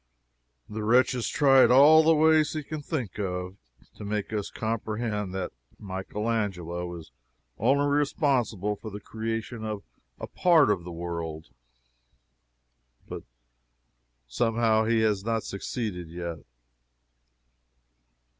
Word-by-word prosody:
The 105 Hz, 0 st, -5 dB
wretch 125 Hz, +4 st, +4 dB
has 125 Hz, -3 st, -2 dB
tried 135 Hz, -3 st, +5 dB
all 145 Hz, +5 st, +8 dB
the 160 Hz, +1 st, +4 dB
ways 155 Hz, 0 st, +4 dB
he 155 Hz, -1 st, -3 dB
can 155 Hz, +1 st, -6 dB
think 130 Hz, -, -4 dB
of 90 Hz, -1 st, -4 dB, 0.4 s
to -, -, -8 dB
make 105 Hz, +1 st, -3 dB
us 105 Hz, -2 st, -2 dB
comprehend 110 Hz, -2 st, -3 dB
that 95 Hz, -2 st, -3 dB, 0.3 s
Michael 95 Hz, +2 st, -5 dB
Angelo 90 Hz, -6 st, -2 dB
is 80 Hz, -6 st, -11 dB, 0.5 s
only 140 Hz, +1 st, +3 dB
responsible 135 Hz, -, 0 dB
for 110 Hz, +2 st, -9 dB
the 105 Hz, 0 st, -7 dB
creation 115 Hz, +2 st, -5 dB
of 105 Hz, -2 st, -4 dB, 0.4 s
a -, -, -4 dB
part 165 Hz, -10 st, +4 dB
of 95 Hz, -4 st, -1 dB
the 90 Hz, -, -7 dB
world, 85 Hz, -2 st, -6 dB, 1.6 s
but -, -, -6 dB, 1.1 s
somehow 110 Hz, -, +1 dB
he 115 Hz, 0 st, +2 dB
has 105 Hz, -3 st, +1 dB
not 115 Hz, 0 st, -1 dB
succeeded 100 Hz, -4 st, -5 dB
yet. 85 Hz, -1 st, -6 dB
110 Hz, 120 wpm, -27 LUFS, 95-125 Hz, 1.6 s, all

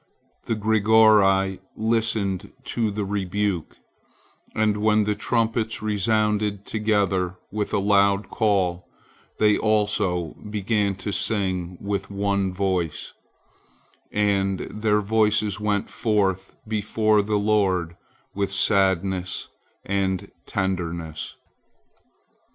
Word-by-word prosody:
The 115 Hz, -, -1 dB
Grigori 105 Hz, -3 st, +4 dB, 0.2 s
listened 110 Hz, -3 st, 0 dB
to 115 Hz, -3 st, -1 dB
the 105 Hz, 0 st, -3 dB
rebuke, 100 Hz, -3 st, -2 dB, 0.8 s
and 105 Hz, -1 st, +2 dB
when 105 Hz, 0 st, +3 dB
the 105 Hz, 0 st, 0 dB
trumpets 115 Hz, 0 st, -1 dB
resounded 105 Hz, -1 st, 0 dB
together 100 Hz, -4 st, 0 dB, 0.2 s
with 105 Hz, 0 st, -2 dB
a -, -, +1 dB
loud 100 Hz, 0 st, +2 dB
call, 90 Hz, -5 st, 0 dB, 0.5 s
they 105 Hz, -1 st, +3 dB
also 105 Hz, -6 st, 0 dB
began 105 Hz, -1 st, 0 dB
to 95 Hz, +2 st, -5 dB
sing 95 Hz, -3 st, -1 dB
with 100 Hz, -1 st, -3 dB
one 100 Hz, -1 st, 0 dB
voice, 90 Hz, -4 st, -2 dB, 1.0 s
and 100 Hz, -2 st, +1 dB
their 105 Hz, 0 st, +1 dB
voices 105 Hz, -1 st, +1 dB
went 105 Hz, -1 st, 0 dB
forth 95 Hz, -4 st, -1 dB
before 110 Hz, 0 st, +2 dB
the 105 Hz, +1 st, 0 dB
Lord 95 Hz, -5 st, +1 dB, 0.4 s
with 100 Hz, -1 st, -2 dB
sadness 95 Hz, -2 st, +1 dB, 0.4 s
and 95 Hz, -2 st, -1 dB, 0.2 s
tenderness. 85 Hz, -4 st, -3 dB
100 Hz, 95 wpm, -24 LUFS, 95-105 Hz, 1.0 s, Grigori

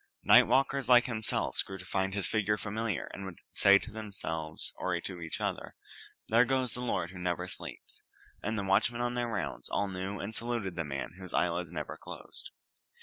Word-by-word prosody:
Night -, -, +8 dB
walkers 135 Hz, -1 st, +2 dB
like 125 Hz, -1 st, +8 dB
himself 110 Hz, -4 st, 0 dB
grew 95 Hz, -, -7 dB
to 90 Hz, -, -10 dB
find 95 Hz, 0 st, 0 dB
his 100 Hz, -, +1 dB
figure 105 Hz, -1 st, +1 dB
familiar, 110 Hz, -2 st, -2 dB
and 100 Hz, -, -6 dB
would 95 Hz, -3 st, -7 dB
say 100 Hz, 0 st, +7 dB
to -, -, -7 dB
themselves, 80 Hz, -7 st, -3 dB
or -, -, 0 dB
to 90 Hz, -2 st, -6 dB
each 80 Hz, -1 st, -3 dB
other, -, -, -3 dB, 0.5 s
"There 115 Hz, +2 st, +6 dB
goes 130 Hz, 0 st, +1 dB
the 125 Hz, -, -3 dB
lord 90 Hz, -8 st, -1 dB
who 95 Hz, -, -9 dB
never 90 Hz, 0 st, -1 dB
sleeps"; -, -, -9 dB, 0.4 s
and 110 Hz, +2 st, -1 dB
the 100 Hz, -, -1 dB
watchmen 110 Hz, +5 st, +2 dB
on 120 Hz, 0 st, 0 dB
their 120 Hz, -1 st, 0 dB
rounds 90 Hz, -10 st, -3 dB
all 100 Hz, 0 st, 0 dB
knew 95 Hz, +1 st, -4 dB
and 105 Hz, +2 st, -4 dB
saluted 115 Hz, -6 st, -2 dB
the 85 Hz, -, -1 dB
man 70 Hz, -1 st, -4 dB
whose 90 Hz, -2 st, -6 dB
eyelids 85 Hz, -1 st, +1 dB
never 85 Hz, -, -5 dB
closed. -, -, -8 dB
100 Hz, 195 wpm, -31 LUFS, 90-115 Hz, 0.5 s, Night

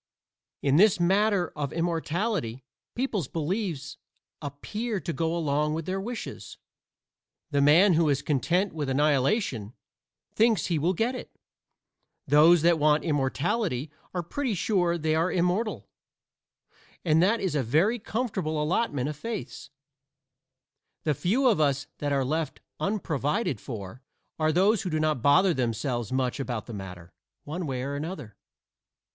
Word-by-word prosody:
In 140 Hz, +1 st, +3 dB
this 200 Hz, 0 st, +5 dB
matter 195 Hz, +1 st, +2 dB
of 145 Hz, -3 st, -3 dB
immortality, 165 Hz, -, -2 dB, 0.3 s
people's 230 Hz, -, -1 dB
beliefs 165 Hz, -, -3 dB, 0.4 s
appear 205 Hz, -, -4 dB
to 170 Hz, -2 st, -4 dB
go 165 Hz, +1 st, -1 dB
along 150 Hz, -1 st, 0 dB
with 165 Hz, -1 st, -4 dB
their 190 Hz, +2 st, -2 dB
wishes. 235 Hz, +3 st, -7 dB, 0.9 s
The 145 Hz, -1 st, +2 dB
man 170 Hz, +7 st, +6 dB
who 160 Hz, -1 st, +3 dB
is 140 Hz, -1 st, 0 dB
content 170 Hz, +7 st, +1 dB
with 150 Hz, -4 st, -3 dB
annihilation 135 Hz, -, +1 dB, 0.6 s
thinks 225 Hz, 0 st, +3 dB
he 170 Hz, -4 st, 0 dB
will 175 Hz, +5 st, +1 dB
get 230 Hz, +7 st, 0 dB
it; 250 Hz, -, -8 dB, 0.9 s
those 155 Hz, +4 st, +6 dB
that 170 Hz, -1 st, +4 dB
want 150 Hz, 0 st, +3 dB
immortality 145 Hz, -, -1 dB, 0.2 s
are 180 Hz, -1 st, -3 dB
pretty 250 Hz, -, -2 dB
sure 175 Hz, -2 st, +1 dB
they 155 Hz, -1 st, 0 dB
are 165 Hz, +3 st, +1 dB
immortal; 185 Hz, +5 st, 0 dB, 1.2 s
and 160 Hz, -1 st, +4 dB
that 215 Hz, +6 st, +3 dB
is 190 Hz, -6 st, -1 dB
a 145 Hz, -, +1 dB
very 160 Hz, -, +2 dB
comfortable 200 Hz, -9 st, -2 dB
allotment 150 Hz, -, 0 dB
of 150 Hz, -, -4 dB
faiths. 210 Hz, -5 st, -6 dB, 1.3 s
The 150 Hz, -, +2 dB
few 220 Hz, -, +1 dB
of 210 Hz, -10 st, +3 dB
us 140 Hz, -1 st, +1 dB
that 145 Hz, -1 st, -1 dB
are 135 Hz, -2 st, +1 dB
left 155 Hz, +1 st, -2 dB, 0.2 s
unprovided 165 Hz, -, -1 dB
for 110 Hz, 0 st, -7 dB, 0.4 s
are 155 Hz, 0 st, +2 dB
those 195 Hz, +5 st, +3 dB
who 185 Hz, -, -3 dB
do 155 Hz, -1 st, -1 dB
not 155 Hz, -5 st, 0 dB
bother 175 Hz, -, +5 dB
themselves 120 Hz, -2 st, -2 dB
much 130 Hz, 0 st, -1 dB
about 120 Hz, -5 st, -3 dB
the 120 Hz, -, -8 dB
matter, 90 Hz, -4 st, -9 dB, 0.3 s
one 165 Hz, +3 st, -4 dB
way 130 Hz, -2 st, -3 dB
or 140 Hz, +1 st, -3 dB
another. 145 Hz, -, -6 dB
160 Hz, 140 wpm, -27 LUFS, 140-190 Hz, 1.3 s, man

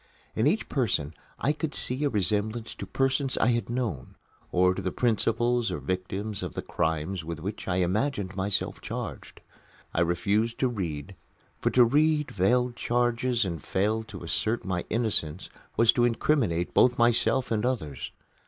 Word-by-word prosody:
In 110 Hz, -, +2 dB
each 195 Hz, +9 st, +1 dB
person 95 Hz, -, 0 dB, 0.2 s
I 145 Hz, -, +1 dB
could 155 Hz, 0 st, -4 dB
see 130 Hz, +4 st, 0 dB
a 145 Hz, -, +3 dB
resemblance 110 Hz, +1 st, +1 dB
to 100 Hz, -, -8 dB
persons 135 Hz, +4 st, 0 dB
I 115 Hz, -, +3 dB
had 120 Hz, -1 st, 0 dB
known, 115 Hz, -, -3 dB, 0.4 s
or 90 Hz, +1 st, +4 dB
to 95 Hz, -, -4 dB
the 95 Hz, -1 st, -2 dB
principals 120 Hz, +1 st, +1 dB
or -, -, -2 dB
victims 95 Hz, +3 st, -3 dB
of -, -, -5 dB
the -, -, -3 dB
crimes 80 Hz, +2 st, -1 dB
with 85 Hz, 0 st, -5 dB
which 100 Hz, +6 st, -6 dB
I 90 Hz, -, 0 dB
imagined 95 Hz, +2 st, 0 dB
myself 95 Hz, +1 st, -1 dB
charged. -, -, -6 dB, 0.5 s
I 85 Hz, -, +1 dB
refused 105 Hz, +7 st, +1 dB
to 130 Hz, -, +2 dB
read; 95 Hz, -5 st, -4 dB, 0.4 s
for -, -, +1 dB
to 125 Hz, -1 st, +6 dB
read 150 Hz, +4 st, +2 dB
veiled 120 Hz, +6 st, +2 dB
charges 120 Hz, -1 st, +1 dB
and 85 Hz, -5 st, -4 dB
fail 105 Hz, +4 st, 0 dB
to -, -, -9 dB
assert 115 Hz, +2 st, -1 dB
my 95 Hz, -2 st, -2 dB
innocence 100 Hz, -8 st, -1 dB, 0.3 s
was 115 Hz, 0 st, +6 dB
to 120 Hz, -, +3 dB
incriminate 115 Hz, -, +1 dB
both 125 Hz, -1 st, +4 dB
myself 120 Hz, +2 st, +2 dB
and 110 Hz, -2 st, +1 dB
others. 80 Hz, -, -2 dB
110 Hz, 160 wpm, -27 LUFS, 95-125 Hz, 0.5 s, to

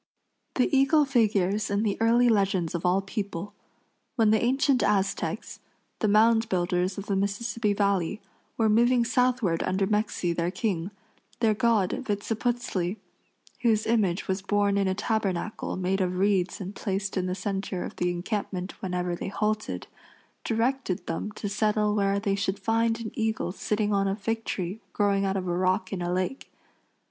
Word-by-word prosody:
The 255 Hz, +2 st, +2 dB
eagle 280 Hz, +3 st, +4 dB
figures 210 Hz, -5 st, +1 dB
in 200 Hz, +1 st, +1 dB
the 205 Hz, -3 st, +1 dB
early 235 Hz, +2 st, +4 dB
legends 195 Hz, -6 st, +2 dB
of 170 Hz, +1 st, -1 dB
all 190 Hz, +2 st, +2 dB
people. 200 Hz, -1 st, -4 dB, 0.6 s
When 225 Hz, -4 st, +4 dB
the 220 Hz, -, +3 dB
ancient 265 Hz, +2 st, +2 dB
Aztecs, 200 Hz, 0 st, -1 dB, 0.4 s
the 215 Hz, -, +1 dB
mound 225 Hz, +2 st, +4 dB
builders 180 Hz, 0 st, 0 dB
of 200 Hz, -, -5 dB
the 200 Hz, -, -1 dB
Mississippi 205 Hz, +2 st, 0 dB
Valley, 200 Hz, -1 st, 0 dB, 0.4 s
were 225 Hz, -, +3 dB
moving 235 Hz, +3 st, +4 dB
southward 245 Hz, -8 st, +1 dB
under 190 Hz, +1 st, +1 dB
Mexi, 205 Hz, -4 st, 0 dB
their 170 Hz, +1 st, 0 dB
king, 185 Hz, -3 st, -2 dB, 0.5 s
their 225 Hz, -2 st, +3 dB
god, 220 Hz, -4 st, +2 dB, 0.2 s
Vitziputzli, 210 Hz, -2 st, -1 dB, 0.6 s
whose 220 Hz, -3 st, +2 dB
image 210 Hz, -6 st, +1 dB
was 190 Hz, 0 st, -1 dB
borne 200 Hz, 0 st, +1 dB
in 200 Hz, -1 st, +2 dB
a 190 Hz, -, 0 dB
tabernacle 210 Hz, -2 st, -2 dB
made 190 Hz, +1 st, 0 dB
of 180 Hz, -1 st, 0 dB
reeds 190 Hz, -2 st, +1 dB
and 195 Hz, 0 st, -6 dB
placed 195 Hz, -2 st, -2 dB
in 185 Hz, -1 st, 0 dB
the 180 Hz, -, -2 dB
center 195 Hz, -1 st, -3 dB
of -, -, -7 dB
the 180 Hz, -, +1 dB
encampment 185 Hz, +1 st, -4 dB
whenever 180 Hz, -2 st, -2 dB
they -, -, -5 dB
halted, 215 Hz, +1 st, -2 dB, 0.6 s
directed 230 Hz, -3 st, -1 dB
them 165 Hz, +5 st, -3 dB
to 205 Hz, -, -5 dB
settle 210 Hz, 0 st, +1 dB
where 200 Hz, -1 st, +1 dB
they 200 Hz, -1 st, 0 dB
should 195 Hz, 0 st, -1 dB
find 225 Hz, +2 st, +1 dB
an 220 Hz, -, -5 dB
eagle 220 Hz, -5 st, -1 dB
sitting 210 Hz, +2 st, -1 dB
on 195 Hz, 0 st, +2 dB
a 195 Hz, -, 0 dB
fig 225 Hz, +2 st, -3 dB
tree 185 Hz, +3 st, -3 dB
growing 200 Hz, -1 st, +2 dB
out 195 Hz, 0 st, 0 dB
of 185 Hz, -1 st, -3 dB
a 175 Hz, -, 0 dB
rock 185 Hz, +1 st, 0 dB
in 185 Hz, -, -3 dB
a 175 Hz, 0 st, -1 dB
lake. 185 Hz, +9 st, -2 dB
200 Hz, 165 wpm, -27 LUFS, 185-220 Hz, 0.6 s, eagle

